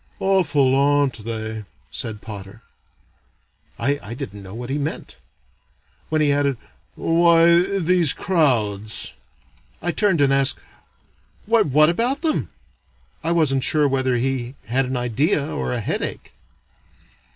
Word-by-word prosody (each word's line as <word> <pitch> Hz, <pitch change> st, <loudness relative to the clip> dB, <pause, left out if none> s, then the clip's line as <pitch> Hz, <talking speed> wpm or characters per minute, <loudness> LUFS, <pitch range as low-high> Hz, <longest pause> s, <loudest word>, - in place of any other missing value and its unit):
"Awful, 170 Hz, -9 st, +2 dB
aren't 140 Hz, -4 st, +2 dB
they!" 110 Hz, -1 st, -4 dB, 0.3 s
said 110 Hz, -2 st, -5 dB
Potter. 105 Hz, +1 st, -9 dB, 1.1 s
I 130 Hz, -3 st, -2 dB
didn't 105 Hz, -4 st, -7 dB
know 95 Hz, +1 st, -10 dB
what 120 Hz, +2 st, -6 dB
he 145 Hz, -, -1 dB
meant. 145 Hz, +2 st, -5 dB, 0.9 s
When 155 Hz, 0 st, +1 dB
he 145 Hz, -1 st, +3 dB
added, 140 Hz, -2 st, +1 dB, 0.4 s
"Why, 170 Hz, +3 st, +4 dB
these 180 Hz, -3 st, +3 dB
crowds," 110 Hz, -, 0 dB, 0.7 s
I 175 Hz, -, -1 dB
turned 195 Hz, -3 st, +1 dB
and 140 Hz, -1 st, +3 dB
asked, 135 Hz, -1 st, +2 dB, 0.9 s
"Why, 225 Hz, +1 st, +3 dB
what 155 Hz, -3 st, +4 dB
about 245 Hz, -, 0 dB
them?" 315 Hz, -2 st, -1 dB, 0.7 s
I 165 Hz, -, 0 dB
wasn't 145 Hz, -6 st, +2 dB
sure 150 Hz, +1 st, +3 dB
whether 130 Hz, -2 st, 0 dB
he 125 Hz, 0 st, -2 dB
had 130 Hz, +3 st, +1 dB
an 130 Hz, 0 st, -2 dB
idea 130 Hz, +5 st, 0 dB
or 65 Hz, -1 st, -3 dB
a -, -, -1 dB
headache. -, -, -4 dB
140 Hz, 125 wpm, -21 LUFS, 120-165 Hz, 1.1 s, Why